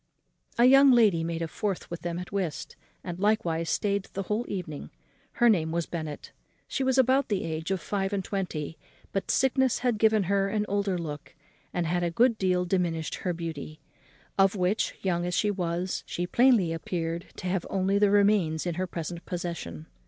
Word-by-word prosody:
A 240 - +6
young 270 +2 +8
lady 210 -9 +4
made 165 0 -2
a - - -2
fourth 195 +3 -3
with 170 - -5
them 170 -1 -3
at 180 0 -7
whist, 190 -6 -3 0.3
and 175 -1 -6
likewise 175 -6 +1
stayed 200 -2 0
the 195 - -3
whole 215 +5 -1
evening. 170 -7 -5 0.4
Her 240 - +3
name 165 -8 +3
was 170 0 -1
Bennet. 155 -3 -6 0.4
She 270 - -2
was 260 0 +2
about 260 +1 +4
the 205 -3 0
age 160 +1 -4
of 190 -1 0
five 195 +3 -2
and 195 -2 -2
twenty; 165 -6 -4 0.3
but 195 - -3
sickness 265 -1 +2
had 235 -4 +1
given 220 -1 +4
her 195 +1 +1
an 210 0 0
older 200 -2 0
look, 150 -4 -7 0.4
and 175 -1 -1
had 175 +2 0
a 175 - +1
good 230 +6 +3
deal 180 -1 +1
diminished 170 -3 -1
her 180 - -2
beauty; 160 -2 -6 0.6
of 195 +1 +5
which, 185 +3 0
young 175 -2 0
as 175 0 -1
she 210 - +2
was, 180 -1 -2
she 175 - -2
plainly 225 -5 +4
appeared 165 0 -3
to - - -8
have 180 -1 -1
only 195 +1 +1
the 205 -1 +4
remains 200 -6 +3
in 175 - -1
her 185 - -1
present 170 0 -5
possession. 170 - -5
185 Hz, 190 wpm, -28 LUFS, 170-205 Hz, 0.6 s, young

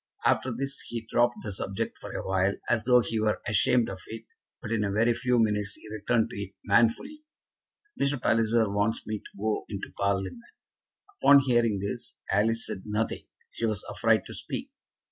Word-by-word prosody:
After 130 - +2
this 135 +4 -4
he 115 -1 -5
dropped 120 +1 +2
the 105 - -4
subject 95 0 -3
for - - -8
a - - -4
while, 95 +1 +2
as 115 -3 +1
though 125 0 +6
he 115 -1 -2
were 110 0 +1
ashamed 115 +3 +3
of 95 - -6
it, 115 0 -7 0.4
but 110 - -7
in 110 -2 +1
a 100 - 0
very 115 +4 +3
few 125 +1 +1
minutes 105 -3 +1
he - - -12
returned 110 +2 +1
to 100 - -5
it 100 -1 -7
manfully. 120 - +2 0.8
"Mr. 140 -1 +1
Palliser 115 -1 +2
wants 105 +3 0
me 110 -1 -3
to - - -16
go 110 +1 -1
into 100 -1 -5
Parliament." 100 - -1 0.8
Upon 140 0 +8
hearing 120 -5 +2
this 120 +4 -5 0.2
Alice 115 +3 +2
said 95 - -4
nothing. 105 +2 -2 0.2
She 115 - -1
was 105 -4 -1
afraid - - +2
to - - -9
speak. - - -6
110 Hz, 185 wpm, -28 LUFS, 100-120 Hz, 0.8 s, Upon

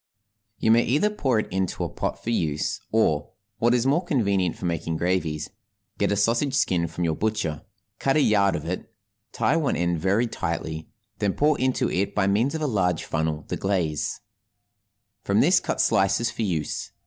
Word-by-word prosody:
You 110 - +2
may 115 +1 +6
either 150 - +2
pour 135 - 0
it 110 - 0
into 95 -1 -1
a - - -2
pot - - -4
for 115 - -2
use, 80 -9 -1
or, 75 -10 +2 0.3
what 120 +2 +3
is 120 0 +1
more 145 +7 +2
convenient 100 - +1
for - - -7
making 85 -1 -2
gravies, 85 -3 -1 0.5
get - - +2
a - - +2
sausage 115 +7 +1
skin 85 -9 +1
from 85 +2 -4
your 80 -2 +1
butcher, 105 -8 -1 0.4
cut 135 - +1
a 155 - +4
yard 100 -5 +3
of 75 - -5
it, 90 +2 -5 0.4
tie 145 - +1
one 155 -4 +1
end 85 0 0
very 100 +7 +2
tightly, 80 -8 -4 0.3
then 100 -2 +1
pour 150 +1 +3
into 130 0 +1
it 95 +2 -1
by 105 - +2
means 110 +10 +1
of 160 - -3
a - - +2
large 95 - 0
funnel 80 -2 -2
the - - -2
glaze; 90 -6 -1 1.0
from - - +1
this - - +5
cut - - -3
slices 100 +5 +2
for - - -5
use. 85 -8 -2
100 Hz, 185 wpm, -25 LUFS, 85-120 Hz, 1.0 s, may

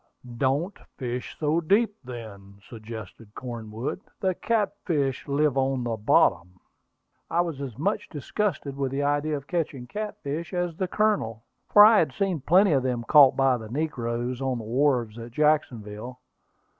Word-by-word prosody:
"Don't 140 - 0 0.2
fish 125 -1 -5
so 155 +2 +1
deep, 205 +6 +2
then," 110 -6 -9
suggested 110 -1 -10
Cornwood. 120 - -5 0.2
"The 190 -1 +1
catfish 175 - -1
live 140 -1 +2
on 130 -1 0
the 115 -1 -1
bottom." 90 -4 +2 0.7
I 170 - +2
was 165 -5 -4
as 130 -5 -6
much 200 +9 -1
disgusted 150 -1 -3
with 135 -1 -1
the 140 +1 -1
idea 145 +1 0
of 140 - -9
catching 150 -7 -3
catfish 170 - -5
as 175 -2 -1
the 185 +2 -2
Colonel, 180 - 0 0.3
for 205 0 +9
I 220 0 +7
had 155 -5 +1
seen 190 -6 -1
plenty 185 +7 +4
of 135 -3 +3
them 125 -2 -2
caught 135 +2 +7
by 135 -2 +3
the 110 -2 -9
negroes 125 -3 -2
on 130 -2 -1
the 115 - -6
wharves 120 -2 +1
at 115 0 -9
Jacksonville. 125 -6 0
135 Hz, 155 wpm, -26 LUFS, 120-160 Hz, 0.7 s, for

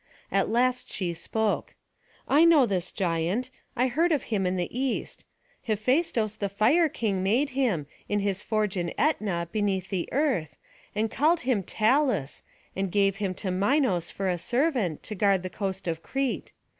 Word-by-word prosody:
At 195 0 +2
last 250 +2 +1
she 180 -4 -2
spoke; 215 +6 -2 0.5
"I 290 +4 +5
know 325 -6 +6
this 185 -5 -2
giant. 180 +8 -1 0.2
I 250 0 +2
heard 320 +7 +2
of 295 - +1
him 195 -3 +1
in 180 - 0
the 175 -2 -1
East. 260 0 -2 0.4
Hephaistos 225 0 +1
the 200 -2 -2
Fire 285 - +3
King 205 -8 -1
made 240 +10 +1
him, 240 - 0 0.2
in 205 - +1
his 200 -1 -1
forge 215 -2 -1
in 170 -1 -2
Ætna 195 - 0
beneath 200 -3 -1
the 185 -4 -2
earth, 255 - 0 0.4
and 220 +1 0
called 315 +6 +2
him 250 -5 +1
Talus, 220 - +1 0.3
and 195 -1 -2
gave 195 0 +2
him 195 -2 -2
to 190 0 -2
Minos 195 - +1
for 195 - -3
a 180 -2 0
servant, 245 - 0
to - - -4
guard 195 -2 +2
the 185 - -5
coast 190 -1 -4
of 165 -1 -2
Crete. 270 +8 -2
210 Hz, 170 wpm, -27 LUFS, 185-255 Hz, 0.5 s, know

